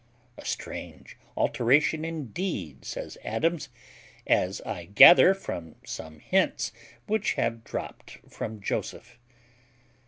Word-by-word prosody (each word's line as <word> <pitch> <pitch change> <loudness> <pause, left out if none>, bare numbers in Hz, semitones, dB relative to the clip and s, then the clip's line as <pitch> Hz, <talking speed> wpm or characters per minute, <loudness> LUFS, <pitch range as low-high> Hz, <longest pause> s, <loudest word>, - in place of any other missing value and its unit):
"A - - -12
strange - - -6 0.2
alteration 150 +6 +2
indeed," 150 - -4
says - - -6
Adams, 165 +9 -1 0.6
"as 95 +3 +1
I 85 -3 -6
gather 170 - +8
from 85 - -7
some 80 -1 -8
hints 105 - 0 0.3
which 215 0 0
have 115 -1 -2
dropped - - -7
from 110 -1 -6
Joseph." 120 - -4
115 Hz, 100 wpm, -27 LUFS, -, 0.6 s, gather